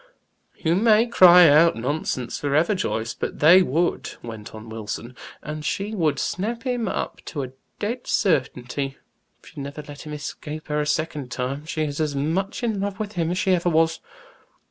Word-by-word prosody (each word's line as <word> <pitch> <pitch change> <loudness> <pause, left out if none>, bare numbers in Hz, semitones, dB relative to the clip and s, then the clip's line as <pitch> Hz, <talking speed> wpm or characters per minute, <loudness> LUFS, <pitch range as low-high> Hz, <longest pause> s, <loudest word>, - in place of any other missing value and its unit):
"You 165 -1 +1
may 215 +4 +4
cry 180 -6 +8
out 165 +3 +6
'nonsense' 130 -1 -2
forever, 150 +7 +2
Joyce, 115 - -2
but - - -4
they 175 +5 +7
would," 170 +2 0
went 110 -2 -8
on 110 +1 -10
Wilson. 110 +2 -6 0.3
"And 150 0 -5
she 200 +7 -2
would 160 -8 +1
snap 230 +5 -2
him 245 -4 -1
up - - -4
to 145 -4 -4
a 130 - -7 0.3
dead 235 +4 -4
certainty; 135 - 0 0.5
she'd - - -16
never 140 +2 -6
let 145 -1 -9
him 150 - -6
escape 150 +1 -7
her 150 0 +1
a 150 - -2
second 150 -3 -2
time. 130 +5 -4
She 155 -1 -1
is 145 -1 -3
as 150 -2 0
much 175 - -1
in 220 -4 0
love 200 0 -3
with 210 -1 -3
him 170 -4 -1
as 180 - -1
she 185 0 +2
ever 175 -1 +2
was!" 165 0 +2
155 Hz, 180 wpm, -23 LUFS, 140-185 Hz, 0.5 s, cry